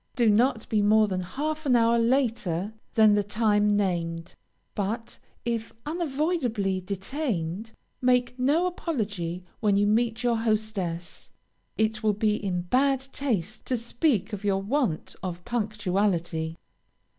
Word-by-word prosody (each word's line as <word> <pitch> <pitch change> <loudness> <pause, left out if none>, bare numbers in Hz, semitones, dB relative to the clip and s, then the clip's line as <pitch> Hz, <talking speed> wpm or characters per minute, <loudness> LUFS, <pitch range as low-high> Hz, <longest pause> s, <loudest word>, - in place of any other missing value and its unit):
Do 235 -3 +4
not 235 +2 +2
be 215 -2 +2
more 215 +1 +5
than 185 -2 -2
half 300 - -3
an 250 - +5
hour 230 0 +4
later 230 -6 +1 0.2
than 215 -2 +6
the 205 - +3
time 205 0 +2
named, 170 -4 -1 0.4
but 215 +3 -3 0.3
if 230 -1 -2
unavoidably 285 - -1
detained, 200 - -3 0.3
make 250 -1 +3
no 295 +8 +3
apology 205 - -3 0.2
when 210 -3 +2
you 200 +1 +3
meet 225 +2 +1
your 240 -1 +2
hostess; 215 -6 -2 0.5
it 220 0 +1
will 215 -1 +2
be 210 +1 +1
in 185 -4 -2
bad 265 +7 +2
taste 215 - -2
to 255 - +1
speak 235 - 0
of 205 0 -5
your 195 -1 +1
want 230 - -1
of 180 -2 -5
punctuality. 195 -7 -1
215 Hz, 135 wpm, -27 LUFS, 195-240 Hz, 0.5 s, than